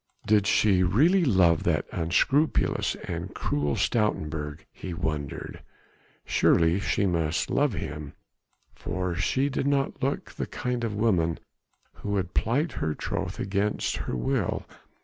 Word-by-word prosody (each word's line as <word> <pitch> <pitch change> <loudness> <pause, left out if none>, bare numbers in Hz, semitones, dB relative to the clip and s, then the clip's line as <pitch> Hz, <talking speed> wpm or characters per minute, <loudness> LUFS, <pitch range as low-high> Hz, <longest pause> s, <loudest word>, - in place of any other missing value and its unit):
Did 105 -2 +3
she 100 -3 +4
really 150 - +4
love 95 - +4
that - - +1
unscrupulous 115 - +1
and - - -5
cruel 75 -1 -1
Stoutenburg, 75 -8 -1
he 90 -2 -7
wondered. 75 -4 -4 0.6
Surely 85 +3 +3
she 100 0 0
must 85 -2 0
love 145 -3 +2
him, 75 -6 -5 0.6
for 90 +1 -3
she 110 +11 +1
did 135 0 -1
not 140 -1 0
look 135 +2 -2
the - - -4
kind 125 -1 -3
of 110 -3 -2
woman 90 -7 +1 0.5
who 105 - -7
would 95 -2 -1
plight 140 +9 +1
her 75 -9 -2
troth 95 -1 -4
against 100 +2 -1
her - - -3
will. - - -1
95 Hz, 130 wpm, -27 LUFS, 80-115 Hz, 0.6 s, she